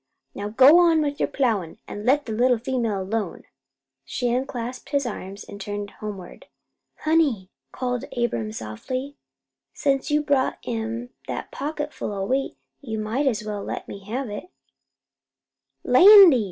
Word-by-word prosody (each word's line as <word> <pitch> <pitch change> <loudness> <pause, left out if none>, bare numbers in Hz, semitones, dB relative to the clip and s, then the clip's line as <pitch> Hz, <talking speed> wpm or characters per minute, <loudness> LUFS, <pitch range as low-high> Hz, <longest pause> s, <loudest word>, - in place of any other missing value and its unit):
Now 200 - -5
you - - -7
go 270 +8 +8
on 330 -3 +4
with 290 -1 -3
your - - +2
plowin' 215 - -1
an' 205 +1 -7
let 285 +3 +3
that 225 - -5
little 245 +2 +3
female 230 -5 -1
alone." 205 -1 -3 0.6
She 240 - -2
unclasped 250 0 -3
his 280 -1 0
arms 200 -3 -6
and 200 - -10
turned 205 0 -5
homeward. 200 -4 -9 0.5
"Honey," 295 - +1 0.2
called 250 -2 -3
Abram 120 - -1
softly, 255 - -5 0.6
"since 275 -2 0
you 300 0 +2
brought 280 -3 +1
'em 230 +1 -4 0.2
that - - -5
pocketful 295 -3 -4
o' 195 -1 -2
wheat, 270 +5 -1 0.2
you 225 -6 -5
might 225 +7 -1
as 220 -5 0
well 210 -1 -4
let - - -5
me 200 - -9
have 250 +5 -3
it." 195 -3 -7 1.3
"Landy!" 365 - +9
245 Hz, 150 wpm, -24 LUFS, 205-275 Hz, 1.3 s, Landy